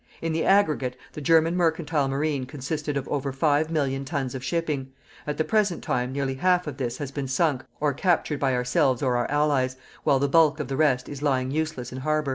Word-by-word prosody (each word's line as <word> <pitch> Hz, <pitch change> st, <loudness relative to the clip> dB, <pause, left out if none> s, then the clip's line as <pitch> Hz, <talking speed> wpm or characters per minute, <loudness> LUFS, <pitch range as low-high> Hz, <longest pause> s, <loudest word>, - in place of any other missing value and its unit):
In 165 Hz, -1 st, -2 dB
the 160 Hz, -, 0 dB
aggregate 150 Hz, -10 st, +2 dB, 0.2 s
the 150 Hz, -, -7 dB
German 165 Hz, +2 st, +4 dB
Mercantile 160 Hz, -4 st, +1 dB
Marine 140 Hz, -1 st, -1 dB
consisted 145 Hz, +1 st, -3 dB
of 135 Hz, -, -4 dB
over 140 Hz, -1 st, -2 dB
5 145 Hz, +3 st, +1 dB
million 140 Hz, -4 st, -1 dB
tons 135 Hz, -3 st, -3 dB
of 130 Hz, -1 st, -6 dB
shipping; 150 Hz, -6 st, -2 dB, 0.4 s
at 150 Hz, -, -2 dB
the 155 Hz, -, +2 dB
present 205 Hz, -2 st, +1 dB
time 125 Hz, 0 st, -1 dB
nearly 135 Hz, -1 st, -1 dB
half 180 Hz, +6 st, +2 dB
of 145 Hz, -3 st, -6 dB
this 125 Hz, -4 st, -3 dB
has 145 Hz, -3 st, -5 dB
been 140 Hz, -1 st, -4 dB
sunk 135 Hz, -1 st, +1 dB, 0.2 s
or 150 Hz, -2 st, +1 dB
captured 160 Hz, -2 st, +1 dB
by 135 Hz, -2 st, +1 dB
ourselves 125 Hz, +1 st, +1 dB
or 125 Hz, -2 st, +2 dB
our 120 Hz, -, 0 dB
Allies, 145 Hz, -3 st, +1 dB, 0.3 s
while 135 Hz, -, +4 dB
the 140 Hz, +1 st, +1 dB
bulk 155 Hz, 0 st, +4 dB
of 150 Hz, -, -4 dB
the 135 Hz, -, -2 dB
rest 135 Hz, -4 st, +2 dB
is 145 Hz, -1 st, -7 dB
lying 130 Hz, -3 st, +1 dB
useless 155 Hz, -5 st, -3 dB
in 130 Hz, -, -6 dB
harbour. 155 Hz, +1 st, 0 dB
145 Hz, 215 wpm, -25 LUFS, 130-155 Hz, 0.4 s, German